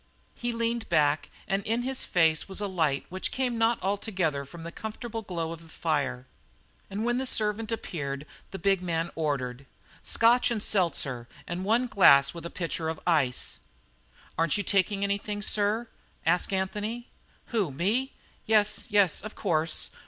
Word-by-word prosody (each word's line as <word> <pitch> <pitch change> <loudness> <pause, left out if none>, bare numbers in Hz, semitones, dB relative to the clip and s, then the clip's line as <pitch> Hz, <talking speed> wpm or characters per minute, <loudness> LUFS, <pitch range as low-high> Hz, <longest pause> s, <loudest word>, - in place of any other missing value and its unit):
He 240 - -2
leaned 230 0 -1
back 150 -3 +2 0.2
and 195 -1 +1
in 230 +3 0
his 265 +1 -1
face 160 0 +2
was 190 - -3
a 205 - -1
light 160 -8 0
which 185 +1 -3
came 250 -3 -1
not 225 +1 +3
altogether 190 -8 -1
from 165 +4 -10
the 170 - -6
comfortable 225 +3 -5
glow 170 -5 -3
of 165 -1 -7
the 165 - -15
fire. 140 -6 -1 0.6
And 205 +3 -3
when 240 +1 +1
the 265 - -1
servant 215 0 0
appeared 145 -10 -4 0.2
the 195 - -6
big 195 -1 +2
man 170 -1 -1
ordered: 140 -4 -2 0.4
"Scotch 240 +2 +4
and 220 -3 -1
seltzer 140 - +1 0.2
and 175 +2 -4
one 230 +5 +3
glass 140 - +6
with 170 -1 -6
a - - -9
pitcher 165 -2 -3
of 160 - -4
ice." 145 -8 +1 0.8
"Aren't 165 +1 +3
you 205 - -1
taking 200 +1 +1
anything, 205 +1 -1
sir?" 210 +3 +1 0.4
asked 175 +4 +2
Anthony. 210 +5 -2 0.5
"Who, 205 -9 +1
me? 215 - 0 0.4
Yes, 210 -1 +3
yes, 200 -5 +3
of 215 - -8
course. 165 -4 0
190 Hz, 160 wpm, -28 LUFS, 160-220 Hz, 0.8 s, glass